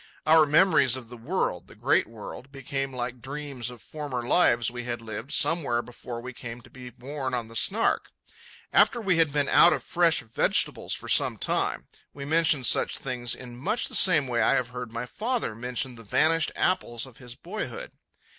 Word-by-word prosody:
Our 155 Hz, 0 st, +6 dB
memories 150 Hz, -5 st, +4 dB
of 125 Hz, -3 st, -9 dB
the 120 Hz, -, -9 dB
world, 115 Hz, -, -2 dB
the -, -, -16 dB
great -, -, +1 dB
world, 115 Hz, +4 st, -10 dB
became 135 Hz, 0 st, -4 dB
like 125 Hz, -1 st, -5 dB
dreams 140 Hz, -2 st, -4 dB
of 120 Hz, -3 st, -12 dB
former 145 Hz, -5 st, -5 dB
lives 120 Hz, -4 st, +3 dB
we 120 Hz, 0 st, -6 dB
had 120 Hz, -1 st, -3 dB
lived 115 Hz, +3 st, -7 dB
somewhere 140 Hz, -8 st, +1 dB
before 120 Hz, -1 st, -8 dB
we 130 Hz, +1 st, -8 dB
came 120 Hz, -1 st, -8 dB
to -, -, -19 dB
be 125 Hz, -1 st, -10 dB
born 130 Hz, +2 st, -5 dB
on 115 Hz, -2 st, -4 dB
the 115 Hz, -, -12 dB
Snark. 215 Hz, -, +2 dB, 0.6 s
After 240 Hz, -, +4 dB
we 190 Hz, -6 st, +1 dB
had 160 Hz, -3 st, +3 dB
been 145 Hz, -1 st, +1 dB
out 175 Hz, -, +6 dB
of 140 Hz, -, -4 dB
fresh 170 Hz, -2 st, +2 dB
vegetables 115 Hz, 0 st, 0 dB
for -, -, -8 dB
some -, -, +3 dB
time, -, -, -1 dB, 0.3 s
we 140 Hz, -1 st, -7 dB
mentioned 155 Hz, -3 st, +3 dB
such -, -, +3 dB
things 125 Hz, -2 st, -2 dB
in 125 Hz, -2 st, -11 dB
much 200 Hz, -, -1 dB
the -, -, -8 dB
same 160 Hz, -7 st, +5 dB
way 120 Hz, -2 st, 0 dB
I -, -, +4 dB
have 125 Hz, -1 st, -1 dB
heard 125 Hz, -2 st, -7 dB
my 115 Hz, +1 st, -4 dB
father 225 Hz, -, -2 dB
mention 125 Hz, +3 st, -3 dB
the 115 Hz, -1 st, -13 dB
vanished 160 Hz, -, +2 dB
apples 120 Hz, -10 st, 0 dB
of 130 Hz, -3 st, -15 dB
his 125 Hz, -2 st, -8 dB
boyhood. 215 Hz, -, -6 dB
130 Hz, 195 wpm, -26 LUFS, 120-155 Hz, 0.6 s, Our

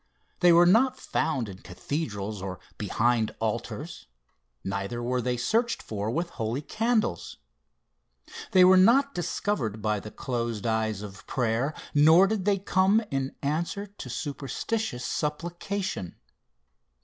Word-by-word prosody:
They 175 Hz, -1 st, +6 dB
were 170 Hz, +1 st, +7 dB
not 250 Hz, +8 st, +4 dB
found 135 Hz, -8 st, -1 dB
in 95 Hz, -2 st, -9 dB
cathedrals 105 Hz, -, -4 dB
or 95 Hz, -1 st, -5 dB, 0.2 s
behind 110 Hz, +2 st, +1 dB
altars -, -, -4 dB, 0.6 s
neither 100 Hz, +5 st, -3 dB
were 125 Hz, +1 st, 0 dB
they 125 Hz, 0 st, -1 dB
searched 230 Hz, -, 0 dB
for 105 Hz, 0 st, -3 dB
with 170 Hz, +7 st, -2 dB
holy 115 Hz, +4 st, -3 dB
candles. 220 Hz, -, -1 dB, 1.1 s
They 185 Hz, -1 st, +6 dB
were 185 Hz, +1 st, +7 dB
not 270 Hz, +9 st, +5 dB
discovered 165 Hz, -, -2 dB
by 105 Hz, -1 st, 0 dB
the 105 Hz, -, -8 dB
closed 115 Hz, -3 st, -3 dB
eyes 110 Hz, -2 st, 0 dB
of 95 Hz, -2 st, -10 dB
prayer, 125 Hz, +4 st, 0 dB, 0.2 s
nor 160 Hz, +5 st, +7 dB
did 200 Hz, -2 st, -1 dB
they 205 Hz, -1 st, +3 dB
come 195 Hz, +3 st, +3 dB
in 135 Hz, -1 st, -2 dB
answer 170 Hz, +7 st, -1 dB
to 200 Hz, -10 st, -10 dB
superstitious 140 Hz, -, -3 dB
supplication. 170 Hz, -, -3 dB
140 Hz, 125 wpm, -27 LUFS, -, 1.1 s, were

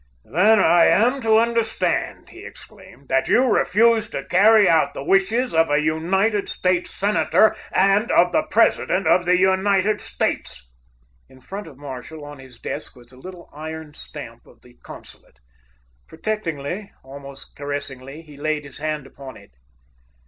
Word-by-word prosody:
[Illustration: 180 Hz, -, +2 dB
"Then 220 Hz, -1 st, +6 dB
I 170 Hz, +1 st, +5 dB
am 250 Hz, +6 st, +2 dB
to 220 Hz, -2 st, +3 dB
understand," 230 Hz, -1 st, -1 dB
he -, -, -13 dB
exclaimed, 185 Hz, -9 st, -14 dB
"that 135 Hz, -, +1 dB
you 250 Hz, -, +4 dB
refuse 225 Hz, -1 st, +2 dB
to -, -, -5 dB
carry 210 Hz, +2 st, +5 dB
out 160 Hz, -2 st, +2 dB
the -, -, -6 dB
wishes 205 Hz, -, +1 dB
of 165 Hz, -1 st, +3 dB
a 145 Hz, -, +2 dB
United 185 Hz, +7 st, 0 dB
States 185 Hz, -1 st, -1 dB
Senator 210 Hz, +2 st, +2 dB, 0.2 s
and 195 Hz, +4 st, +2 dB
of 175 Hz, +1 st, +3 dB
the -, -, +2 dB
President 195 Hz, -3 st, +2 dB
of 180 Hz, -, +3 dB
the 180 Hz, 0 st, +4 dB
United 190 Hz, +2 st, +1 dB
States?"] -, -, -4 dB, 0.6 s
In 130 Hz, -1 st, -18 dB
front 195 Hz, +8 st, -8 dB
of 140 Hz, -5 st, -14 dB
Marshall, 145 Hz, +2 st, -9 dB
on 145 Hz, -1 st, -11 dB
his 130 Hz, -2 st, -14 dB
desk, 145 Hz, +5 st, -7 dB
was 120 Hz, 0 st, -16 dB
the 130 Hz, -, -17 dB
little 180 Hz, +5 st, -11 dB
iron 155 Hz, 0 st, -8 dB
stamp 120 Hz, -6 st, -11 dB
of 120 Hz, -, -21 dB
the 125 Hz, -, -18 dB
consulate. -, -, -14 dB, 0.7 s
Protectingly, 180 Hz, 0 st, -5 dB
almost 140 Hz, 0 st, -12 dB
caressingly, 145 Hz, 0 st, -7 dB
he 150 Hz, -2 st, -15 dB
laid 150 Hz, +1 st, -3 dB
his 140 Hz, -, -12 dB
hand 155 Hz, -2 st, -3 dB
upon 135 Hz, -1 st, -12 dB
it. -, -, -18 dB
165 Hz, 155 wpm, -21 LUFS, 145-205 Hz, 0.7 s, Then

